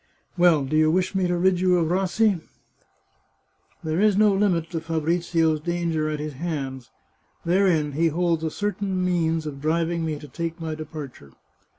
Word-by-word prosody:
Well, 170 -5 +4
do 135 - -2
you 155 0 +4
wish 185 +3 +1
me 190 -2 +1
to 175 0 0
rid 180 0 +2
you 180 -1 +3
of 165 -2 +1
Rassi? 195 +1 +1 1.4
There 160 +3 -1
is 210 -2 +3
no 210 -1 +5
limit 185 -5 +1
to 165 -2 -3
Fabrizio's 165 0 0
danger 165 -1 -1
at 150 -1 -3
his 150 0 -5
hands. 135 -5 -5 0.6
Therein 170 -4 +2
he 160 +4 +1
holds 165 0 0
a 160 - 0
certain 200 0 -2
means 165 -3 0
of 140 -2 -6
driving 165 +2 0
me 155 -2 -2
to 150 - -11
take 165 +2 -5
my 160 -1 -4
depar 155 -3 -7
ture." 70 - -17
165 Hz, 175 wpm, -24 LUFS, 155-180 Hz, 1.4 s, no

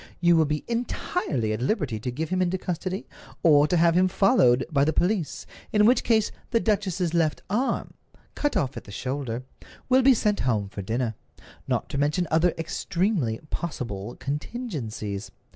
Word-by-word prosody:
You 175 0 +5
will 160 -1 +4
be 150 0 -2
entirely 230 - -1
at 110 - -3
liberty 130 - 0
to 125 - -3
give 150 +6 -3
him 185 0 0
into 185 +1 +1
custody, 185 +2 -3 0.4
or 150 -3 +6
to 175 - +2
have 170 0 +4
him 185 +2 +4
followed 180 - +4
by 140 -2 +3
the 155 - +3
police, 180 -1 0 0.3
in 210 -1 +4
which 245 +2 +4
case 220 -2 +2 0.2
the 230 - +2
duchess's 195 -6 0
left 160 -3 +1
arm, 245 +6 0 0.4
cut 290 - 0
off 135 -1 -1
at - - -8
the - - -11
shoulder, 130 +1 -3 0.5
will 260 +1 +5
be 265 0 +6
sent 210 -2 +1
home 110 -6 0
for 100 0 -6
dinner—not 110 +2 -4
to 140 - -3
mention 150 +5 +1
other 165 +2 +4
extremely 170 - -1
possible 120 - -4
contingencies. 140 - -4
160 Hz, 165 wpm, -26 LUFS, 125-195 Hz, 0.5 s, or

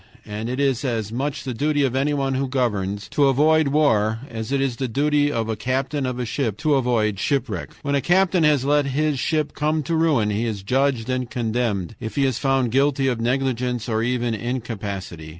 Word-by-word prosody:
And 105 +2 -5
it 130 +2 -3
is 135 -3 +1
as 115 -5 -2
much 135 +4 -3
the 130 - -4
duty 145 +4 +1
of 130 -2 0
anyone 135 0 0
who 135 +1 -1
governs 105 -6 -1
to 145 -1 +3
avoid 155 +3 +4
war 115 -7 +2
as 110 +1 -5
it 140 - +1
is 135 -3 -1
the 130 - -2
duty 145 +4 +1
of 115 -4 -1
a 110 - -1
captain 135 +3 -1
of 125 -1 -3
a 125 - -2
ship 115 -3 -2
to 155 +3 +1
avoid 115 -7 +1
shipwreck. 130 0 -1
"When 140 -1 -1
a 140 - +2
captain 180 0 +3
has 150 -4 +3
let 145 0 +2
his 145 +1 0
ship 155 +2 0
come 155 +1 0
to 165 +3 -1
ruin, 150 -10 +2
he 105 +3 -1
is 105 -4 -4
judged 130 +1 +1
and 130 -2 -2
condemned, 115 -5 -2
if 110 - -6
he 140 - +2
is 130 -4 0
found 135 -4 +1
guilty 135 +1 +2
of 120 -3 -2
negligence 125 -1 -1
or 110 -2 0
even 120 0 0
incapacity. 105 -8 -5
130 Hz, 205 wpm, -22 LUFS, 115-140 Hz, -, avoid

